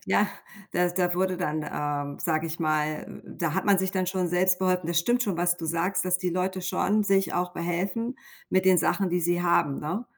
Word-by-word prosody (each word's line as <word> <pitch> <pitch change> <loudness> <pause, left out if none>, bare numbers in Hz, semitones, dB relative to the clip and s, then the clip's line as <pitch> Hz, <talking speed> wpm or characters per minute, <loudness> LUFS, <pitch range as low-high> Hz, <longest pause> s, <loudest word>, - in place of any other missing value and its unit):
ja, 205 - +3 0.4
da 180 0 +2
da 175 0 0
wurde 185 0 0
dann, 155 -3 -2
ähm, 145 -1 -3
sage 160 -1 0
ich 165 +1 -5
mal 155 -1 -1
da 170 -3 -3
hat - - 0
man 200 -2 +4
sich 190 0 0
dann 185 -1 0
schon 185 -1 -1
selbst 180 +1 +2
beholfen. 185 -2 +1
Das 170 0 +1
stimmt 240 +8 +2
schon, 200 -6 -1
was 175 0 +1
du 165 - -7
sagst, 180 +4 0
dass 180 0 +1
die 180 -1 -1
Leute 185 +1 -2
schon 200 +3 +1
sich 195 -1 +2
auch 180 0 -1
behelfen 185 +8 -2 0.3
mit 185 0 +2
den 185 -1 +5
Sachen, 185 +2 +1
die 180 +1 +1
sie 175 +1 +1
haben, 150 -5 +2
ne? 180 +11 -3
180 Hz, 220 wpm, -26 LUFS, 170-185 Hz, 0.4 s, den